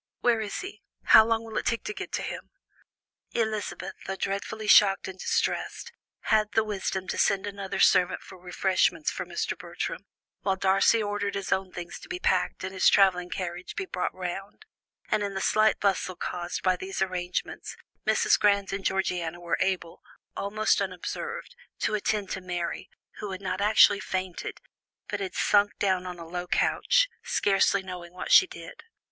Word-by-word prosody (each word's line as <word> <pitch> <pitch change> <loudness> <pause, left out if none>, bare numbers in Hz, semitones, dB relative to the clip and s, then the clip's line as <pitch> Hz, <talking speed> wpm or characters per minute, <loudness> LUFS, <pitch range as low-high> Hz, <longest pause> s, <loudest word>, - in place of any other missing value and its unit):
Where 235 -2 +3
is 205 -2 -4
he? 380 +2 -8 0.2
How 220 - +8
long 225 0 0
will 225 -1 -3
it - - -7
take 230 - 0
to 420 - -4
get 395 -1 -7
to - - -1
him?" - - -6 0.8
Elizabeth, 215 -4 -2
though 195 - -2
dreadfully 200 +3 -3
shocked 200 -2 +6
and 190 0 -8
distressed, 475 - -1 0.3
had 215 -1 +2
the 220 - +3
wisdom 195 -3 -3
to - - -2
send 195 0 +2
another 200 -1 -5
servant 180 -1 +4
for 190 - -12
refreshments 180 -2 +1
for - - -5
Mr. - - -2
Bertram, - - -5 0.3
while 195 -1 +1
Darcy 195 +4 +3
ordered 205 -1 -2
his 195 -1 -4
own 190 -1 0
things 175 -1 -7
to - - -13
be 365 - -3
packed 360 - 0
and 190 0 -4
his 190 - +5
travelling 180 -3 +4
carriage 180 -1 -5
be 400 - -3
brought 180 - -2
round, 185 - -6 0.5
and 215 - +2
in 200 -1 -3
the - - -1
slight 215 +2 +3
bustle 190 -2 0
caused 175 0 -4
by 185 -1 +3
these 190 +1 -2
arrangements, 180 -1 -4 0.3
Mrs. - - +4
Grant 200 -1 +2
and 195 0 -3
Georgiana 180 -3 -1
were 170 -1 -2
able, 180 -3 -1 0.3
almost 210 +1 +1
unobserved, 465 - -5 0.3
to - - 0
attend 210 -1 -1
to 190 - -3
Mary, 175 -2 -4 0.3
who 210 - -5
had 190 -1 -5
not 190 +1 -3
actually 210 -1 +6
fainted, 185 -3 -4 0.5
but 205 - -2
had 190 -2 -4
sunk 205 0 +3
down 185 -2 0
on 180 -1 -6
a 170 - -8
low 175 +1 -5
couch, - - +3
scarcely 195 0 +2
knowing 180 -2 -8
what 180 - -5
she 380 - +8
did. - - -10
195 Hz, 175 wpm, -27 LUFS, 185-210 Hz, 0.8 s, How